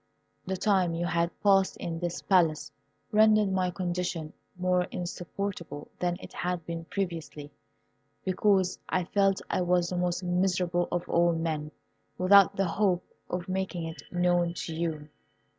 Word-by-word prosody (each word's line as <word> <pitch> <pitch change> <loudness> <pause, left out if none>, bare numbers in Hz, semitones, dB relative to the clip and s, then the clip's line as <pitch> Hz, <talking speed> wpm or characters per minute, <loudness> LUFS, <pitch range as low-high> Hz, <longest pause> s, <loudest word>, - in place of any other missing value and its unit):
The 190 0 -1
time 185 -4 +2
you 170 +1 -1
had 170 -1 +1
passed 195 -2 +4
in 165 -1 -4
this 175 0 -3
Palace 170 -5 +2 0.4
rendered 215 -1 +5
my 185 -1 +1
condition 175 -3 -3 0.2
more 180 0 +2
insupportable 175 -3 -5
than 175 -1 0
it - - -11
had 180 -2 -3
been 165 -1 -5
previously, 165 -6 -4 0.7
because 190 0 +2
I 185 - +1
felt 195 +2 +1
I - - 0
was 175 -1 +2
the 180 - -3
most 180 +1 -1
miserable 180 -1 +1
of 175 -1 -2
all 170 0 +3
men, 160 -2 -2 0.5
without 195 0 +6
the 195 - +1
hope 185 0 +1 0.3
of 180 +1 -3
making 185 -2 -2
it 165 0 -6
known 175 -1 +2
to 165 - -5
you. 160 -2 -3
180 Hz, 145 wpm, -28 LUFS, 170-190 Hz, 0.7 s, without